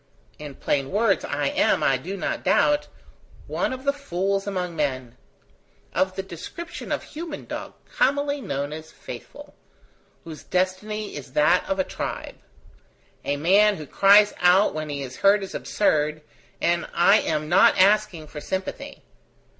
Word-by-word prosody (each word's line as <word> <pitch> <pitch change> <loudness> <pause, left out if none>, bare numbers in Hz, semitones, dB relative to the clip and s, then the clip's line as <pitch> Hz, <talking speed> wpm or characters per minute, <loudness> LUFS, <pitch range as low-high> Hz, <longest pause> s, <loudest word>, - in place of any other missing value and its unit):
In 145 -2 -8
plain 135 0 -1
words, 205 0 +2
I 145 -1 -1
am, - - +2
I 135 - +3
do 185 +10 -6
not - - -3
doubt, 295 0 +3 0.6
one - - -2
of 260 0 -6
the 280 0 +2
fools 195 -7 -2
among 180 -3 -3
men; 130 -6 -2 0.8
of 185 0 0
the 190 - -3
description 195 - -8
of - - -1
human 320 0 -7
dog - - -6
commonly 285 - 0
known 140 - -3
as 160 0 -9
faithful - - -11 0.7
whose 160 -2 -9
destiny 195 +4 -2
is 130 -3 -9
that 150 +5 +3
of 195 - 0
a 190 - +2
tribe. - - -6 0.8
A 145 - -1
man 200 +7 +4
who 155 - -8
cries 200 +6 +5
out 180 +3 +4
when 155 0 -4
he 140 -1 -4
is 130 -1 -8
hurt 200 +1 +4
is 190 - -7
absurd, 155 -5 0 0.4
and 170 0 0
I 195 +5 +5
am 155 -1 -2
not 175 +5 +5
asking 195 -4 +3
for 150 0 -9
sympathy. 190 +4 -5
185 Hz, 155 wpm, -24 LUFS, 150-210 Hz, 0.8 s, cries